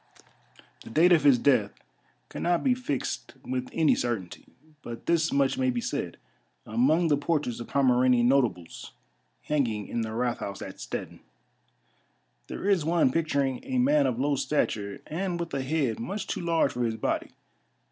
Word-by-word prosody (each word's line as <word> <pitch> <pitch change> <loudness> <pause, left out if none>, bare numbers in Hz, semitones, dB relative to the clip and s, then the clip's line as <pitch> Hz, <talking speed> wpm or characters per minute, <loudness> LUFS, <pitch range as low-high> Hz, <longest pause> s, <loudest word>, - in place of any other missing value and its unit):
The - - -11
date 165 +10 +4
of 165 -4 +5
his 140 -4 +6
death 115 -5 +2 0.5
cannot 175 -1 -1
be 260 - +4
fixed 245 - -4
with 125 0 -3
any 160 -2 +3
certainty; 110 -8 -3 0.3
but 120 -3 -8
this 165 -1 +2
much 140 - +1
may 260 0 +2
be 245 -1 -1
said: 235 +1 -4 0.5
Among 175 -8 +2
the 145 -2 +3
portraits 145 -5 -1
of 120 - -7
Pomeranian 125 -2 +3
notables 120 -11 0 0.5
hanging 120 -9 -1
in 120 - -2
the 110 - -3
Rathhaus 115 -5 -2
at - - -9
Stettin, - - -6 1.3
there - - -5
is 195 -6 +3
one 165 -4 +2
picturing 140 -4 0
a 260 -1 -3
man 285 +4 +3
of 120 - -1
low 145 +2 +1
stature, 110 -8 -1
and 175 +2 -3
with 170 -3 -5
a 135 - -1
head 130 -4 -1
much 195 - -4
too - - -4
large 165 -4 +1
for 125 - -4
his 115 -1 -1
body. - - -2
140 Hz, 160 wpm, -27 LUFS, 120-170 Hz, 1.3 s, his